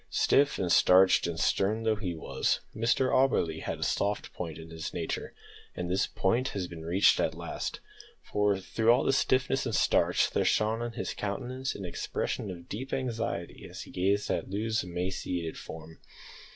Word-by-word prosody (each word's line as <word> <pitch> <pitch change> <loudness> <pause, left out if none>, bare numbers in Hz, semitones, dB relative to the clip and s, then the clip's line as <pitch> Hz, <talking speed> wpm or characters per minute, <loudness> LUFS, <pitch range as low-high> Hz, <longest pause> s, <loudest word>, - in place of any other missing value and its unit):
Stiff 140 +1 +3
and 90 -2 -1
starched 95 0 +6
and 85 -1 -4
stern 105 +3 +1
though 110 -1 +3
he 95 -5 -4
was, 80 - -1
Mr 120 +3 +2
Auberly, 85 -12 +2
had - - -3
a - - -4
soft 100 +1 -1
point 80 -3 -5
in 80 0 -10
his 80 -1 -6
nature, 85 -2 -4 0.4
and 90 0 -3
this 95 - +2
point 120 +7 +1
had 95 -6 -3
been 80 -1 -8
reached 90 +4 +4
at - - 0
last, - - -5 0.4
for 105 -1 +1
through 110 +4 0
all 125 +3 +4
the 135 - +2
stiffness 130 0 +2
and 115 - -1
starch - - +3
there - - +1
shone 110 +2 +1
on 120 0 -3
his - - -3
countenance 125 +6 -3
an 100 - -6
expression 90 +3 -3
of 85 -2 -8
deep 130 +6 -6
anxiety 115 -9 -3
as - - -8
he - - -13
gazed 100 +3 +1
at - - -2
Loo's 110 +3 -1
emaciated 90 -1 -3
form. 80 0 -10
100 Hz, 180 wpm, -29 LUFS, 85-115 Hz, 0.4 s, starched